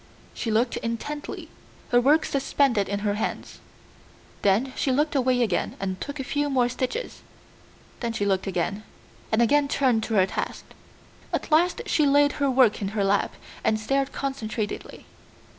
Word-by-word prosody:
She 235 - -4
looked 230 +3 +1
intently, 265 +6 -5 0.4
her 245 0 +4
work 300 +5 +4
suspended 270 -6 +1
in 200 0 -2
her 205 -1 0
hands. 210 - -4 0.8
Then 220 +7 +2
she 270 - 0
looked 295 +4 +1
away 255 -3 +2
again 200 -6 -1
and 190 -1 -3
took 285 0 -5
a - - -2
few 290 +2 -1
more 250 -3 +2
stitches, 260 - -4 0.8
then 235 -2 -2
she 215 -3 -2
looked 195 -1 0
again, 195 +2 -1 0.5
and 225 +2 +4
again 290 +4 +3
turned 255 -5 +2
to 225 - -2
her 190 -2 +5
task. - - -4 0.7
At - - -3
last 340 +4 +3
she 300 -2 +2
laid 285 +1 +5
her 280 - +3
work 250 -5 +4
in 200 +2 -3
her 200 - +2
lap 195 +1 +1 0.3
and 215 0 +2
stared 275 +5 0
concentratedly. 225 -6 -4
245 Hz, 160 wpm, -25 LUFS, 210-275 Hz, 0.8 s, her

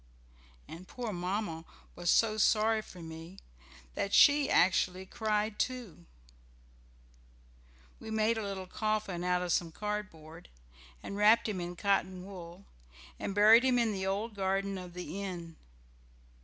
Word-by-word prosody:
And 175 +3 -10
poor 240 -4 -5
Mamma 180 -2 -3 0.3
was 175 0 -2
so 215 -1 +3
sorry 220 +1 +3
for 185 -4 -13
me 165 +3 -10 0.6
that 200 - -1
she 285 -1 +6
actually 185 +1 +2
cried 210 +1 -2
too! 240 - -4 1.9
We 220 - -9
made 220 +1 +1
a 220 - -3
little 195 -2 -5
coffin 210 -3 -2
out 180 0 +1
of 175 -2 0
some 170 -2 0
cardboard, 175 -5 -6 0.5
and 200 - -6
wrapped 215 +3 +5
him 195 -4 -3
in 175 0 -5
cotton 185 -1 0
wool, 180 -1 -10 0.5
and 195 - -4
buried 220 +4 +7
him 255 -1 +3
in 230 -3 +1
the 190 -1 -3
old 210 +4 -2
garden 195 0 -1
of 180 -1 -10
the 180 +2 -6
inn. 175 -4 -6
195 Hz, 140 wpm, -31 LUFS, 180-215 Hz, 1.9 s, buried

